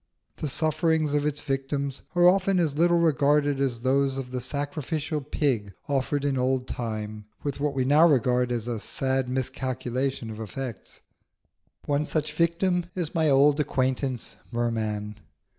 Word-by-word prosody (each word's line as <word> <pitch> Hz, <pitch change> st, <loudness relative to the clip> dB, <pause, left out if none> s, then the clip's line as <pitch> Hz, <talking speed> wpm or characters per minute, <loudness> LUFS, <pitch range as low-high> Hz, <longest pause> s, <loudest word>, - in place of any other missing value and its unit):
The 155 Hz, -, -3 dB
sufferings 155 Hz, +1 st, +1 dB
of 145 Hz, 0 st, +2 dB
its 145 Hz, -1 st, -1 dB
victims 135 Hz, 0 st, -2 dB
are 175 Hz, 0 st, +6 dB
often 190 Hz, 0 st, +3 dB
as 155 Hz, -5 st, +1 dB
little 170 Hz, +2 st, +4 dB
regarded 145 Hz, -3 st, +3 dB
as 125 Hz, -4 st, -1 dB
those 135 Hz, +1 st, +2 dB
of 130 Hz, -2 st, -5 dB
the 125 Hz, -1 st, -3 dB
sacrificial 145 Hz, +3 st, -3 dB
pig 125 Hz, -8 st, -1 dB
offered 140 Hz, 0 st, 0 dB
in 135 Hz, -2 st, +1 dB
old 130 Hz, 0 st, 0 dB
time, 110 Hz, -2 st, -4 dB, 0.2 s
with 140 Hz, -1 st, -3 dB
what 145 Hz, -1 st, -1 dB
we 130 Hz, -1 st, +1 dB
now 150 Hz, +5 st, +6 dB
regard 125 Hz, -2 st, +2 dB
as 120 Hz, -1 st, -2 dB
a 120 Hz, -2 st, -2 dB
sad 130 Hz, +2 st, -1 dB
miscalculation 130 Hz, -1 st, -2 dB
of 110 Hz, -, -8 dB
effects. 120 Hz, +2 st, -7 dB, 0.8 s
One 145 Hz, +1 st, 0 dB
such 150 Hz, -1 st, -1 dB
victim 170 Hz, +2 st, +1 dB
is 175 Hz, -4 st, -3 dB
my 160 Hz, -2 st, +2 dB
old 140 Hz, +2 st, +5 dB
acquaintance 130 Hz, -3 st, -1 dB
Merman. 110 Hz, -3 st, -2 dB
140 Hz, 150 wpm, -26 LUFS, 125-150 Hz, 0.8 s, are